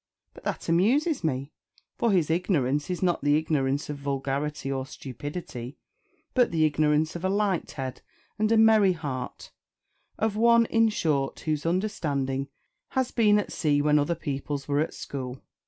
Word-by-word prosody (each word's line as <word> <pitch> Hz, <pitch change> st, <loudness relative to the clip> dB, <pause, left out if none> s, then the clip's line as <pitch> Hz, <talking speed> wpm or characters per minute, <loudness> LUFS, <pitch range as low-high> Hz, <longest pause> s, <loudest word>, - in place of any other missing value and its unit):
But -, -, -14 dB
that -, -, -3 dB
amuses 245 Hz, -, +2 dB
me; 140 Hz, -2 st, -2 dB, 0.4 s
for 235 Hz, -, +1 dB
his 170 Hz, -5 st, +2 dB
ignorance 150 Hz, -5 st, +1 dB
is 180 Hz, 0 st, -2 dB
not 175 Hz, -1 st, +1 dB
the 145 Hz, +1 st, +4 dB
ignorance 145 Hz, -3 st, 0 dB
of 150 Hz, -, -5 dB
vulgarity 140 Hz, +1 st, -2 dB
or 135 Hz, -1 st, -1 dB
stupidity, 135 Hz, -1 st, -7 dB, 0.6 s
but 250 Hz, -2 st, +4 dB
the 160 Hz, -2 st, +2 dB
ignorance 155 Hz, +1 st, +2 dB
of 175 Hz, -, -6 dB
a 190 Hz, -, +1 dB
light 200 Hz, -3 st, 0 dB
head 130 Hz, -3 st, -5 dB, 0.4 s
and 215 Hz, +1 st, +2 dB
a 225 Hz, -, +5 dB
merry 220 Hz, -4 st, +6 dB
heart 140 Hz, -7 st, -6 dB, 0.7 s
of 220 Hz, -1 st, 0 dB
one, 235 Hz, +1 st, +5 dB
in 225 Hz, 0 st, +3 dB
short, 150 Hz, -9 st, -1 dB
whose 155 Hz, 0 st, -1 dB
understanding 145 Hz, -8 st, -1 dB, 0.4 s
has 260 Hz, -1 st, -1 dB
been 210 Hz, -3 st, +4 dB
at 210 Hz, -, -2 dB
sea 145 Hz, -3 st, +1 dB
when 150 Hz, +1 st, +4 dB
other 145 Hz, +4 st, 0 dB
people's 140 Hz, -2 st, -4 dB
were 145 Hz, 0 st, +1 dB
at 155 Hz, -, -1 dB
school. 130 Hz, -2 st, -6 dB
155 Hz, 160 wpm, -27 LUFS, 140-195 Hz, 0.7 s, merry